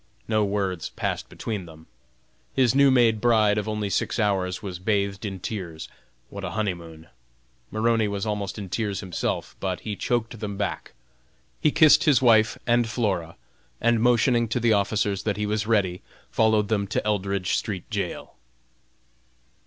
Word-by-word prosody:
No 110 -1 +2
words 100 -4 -2
passed - - -3
between 105 -6 -5
them. 80 0 -14 0.7
His 130 -3 +3
new 140 0 +5
made 115 -4 +4
bride 110 -3 +4
of 105 +1 -4
only 105 -1 -2
six - - -1
hours 95 -4 0
was 90 -3 -5
bathed 100 0 -1
in 95 -2 -5
tears 90 -5 -5 0.4
what 100 0 -7
a 90 - -3
honey 105 -3 +1
moon! 80 -1 -12 0.6
Maroney 110 0 +1
was 100 0 -3
almost 105 -2 -3
in 100 -2 -6
tears 100 +1 -2
himself, 95 -4 -3
but 95 -2 -3
he 105 -2 -4
choked 115 +2 -2
them 100 -2 -5
back. 100 - -4 0.7
He - - +3
kissed 155 +1 +6
his 145 -7 +5
wife 110 -3 +4
and 120 -1 +2
Flora, 95 -9 -1 0.4
and 115 -1 +2
motioning 120 0 +3
to 115 - -1
the 115 -1 +3
officers 100 -1 0
that 105 -1 -2
he 105 - -1
was 105 0 -1
ready, 95 -5 +1 0.3
followed 110 -2 +3
them 100 -2 0
to 105 - -2
Eldridge 100 -3 -1
street 95 -5 -3
jail. - - -4
105 Hz, 160 wpm, -25 LUFS, 95-115 Hz, 0.7 s, kissed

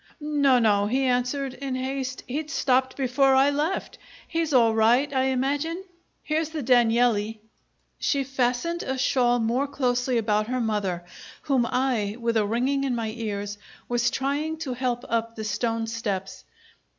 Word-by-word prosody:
"No, 290 -3 +3
no," 205 -3 +3
he 260 +5 +1
answered, 255 +2 0
in 270 -1 -4
haste. 260 0 -3
"He'd 300 +4 -3
stopped 260 -3 +1
before 270 0 +3
I 270 +2 +5
left. 300 +6 -2 0.3
He's 330 -2 -1
all 235 -4 +5
right, 240 +6 +3
I 260 -1 +2
imagine. 285 +7 -1 0.4
Here's 310 0 -1
the 315 -3 -4
Danieli." 230 -3 +3 0.6
She 280 -2 +1
fastened 265 +5 -1
a 265 0 -3
shawl 250 -2 +2
more 240 +4 0
closely 250 -2 0
about 215 -1 +1
her 255 +1 -1
mother, 205 -6 -1 0.4
whom 260 -4 +1
I, 235 -5 0
with 230 -1 -1
a 215 -2 +2
ringing 260 +5 0
in 265 -3 0
my 225 -2 -2
ears, 205 -3 -4 0.3
was 240 0 +1
trying 285 +5 -2
to 260 - -3
help 245 -1 -2
up 230 0 -1
the 220 - -5
stone 225 +2 -1
steps. 205 -4 -4
250 Hz, 155 wpm, -25 LUFS, 230-275 Hz, 0.6 s, I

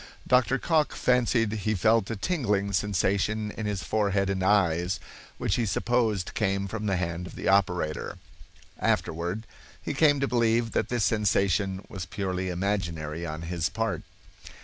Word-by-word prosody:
Dr. 125 +1 +4
Cocke 155 +1 +1
fancied 120 -3 +2
he 110 0 -1
felt 110 +1 +3
a 115 - -2
tingling 100 - 0
sensation 105 +2 0
in 110 0 -4
his 100 -3 -2
forehead 100 -2 +1
and 95 -1 -2
eyes, 95 -2 +2 0.4
which 95 - 0
he 120 - +1
supposed 110 -2 0
came 100 -2 0
from 105 +2 -4
the 95 - +1
hand 90 0 -3
of - - -11
the - - -4
operator. 90 -5 +1 0.6
(Afterward 85 +7 -1 0.3
he - - -4
came 145 0 +4
to 140 - +1
believe 115 -1 +2
that - - 0
this 120 -3 0
sensation 100 -2 +1
was 95 -2 -6
purely 95 -1 -2
imaginary 85 -4 -2
on 80 +1 -5
his 85 -1 -1
part.) - - -2
100 Hz, 150 wpm, -27 LUFS, 90-110 Hz, 0.6 s, Dr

